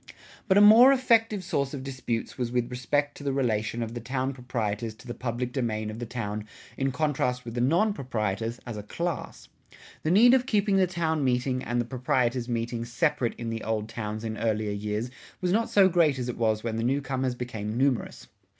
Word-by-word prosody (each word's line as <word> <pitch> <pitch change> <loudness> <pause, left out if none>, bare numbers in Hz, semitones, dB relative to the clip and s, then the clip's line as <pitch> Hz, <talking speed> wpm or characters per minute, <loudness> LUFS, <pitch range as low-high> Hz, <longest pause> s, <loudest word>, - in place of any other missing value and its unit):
But 190 -1 +4
a - - +7
more 225 +6 +9
effective 225 -6 +3
source 140 -5 -1
of 130 - -6
disputes 130 -4 -4
was 120 -2 -3
with 125 -1 -1
respect 145 +4 -1
to - - -10
the 140 - 0
relation 115 -3 0
of 115 0 -6
the 120 - -4
town 130 +3 -2
proprietors 115 -3 -3
to 110 - -17
the 120 - -5
public 125 0 -3
domain 110 -5 -2
of 110 - -8
the 120 - -5
town 105 -3 -4 0.3
in 135 0 0
contrast 125 -3 -1
with 115 - -6
the 120 - -1
non 175 - +3
proprietors 115 - -3
as 120 -3 -6
a - - -4
class. 170 +10 -4 0.5
The 155 - -1
need 230 +8 +7
of 260 -1 +3
keeping 205 -4 +2
the 185 -1 +4
town 160 -4 -1
meeting 130 0 0
and 120 0 -1
the 120 - 0
proprietors' 125 0 0
meeting 115 0 -2
separate 120 +1 0
in 115 -1 -4
the 115 -1 -4
old 110 -1 -2
towns 110 -1 -5
in 110 -1 -4
earlier 110 -1 0
years 105 +4 -3 0.3
was 180 -2 0
not 225 +4 +1
so 195 -2 +6
great 165 -6 +3
as 125 -1 -3
it 125 - -3
was 110 -2 0
when 115 -1 -2
the 115 - -1
new 135 +4 +1
comers 130 -1 -1
became 110 -3 -4
numerous. 130 -2 0
125 Hz, 210 wpm, -27 LUFS, 115-145 Hz, 0.5 s, more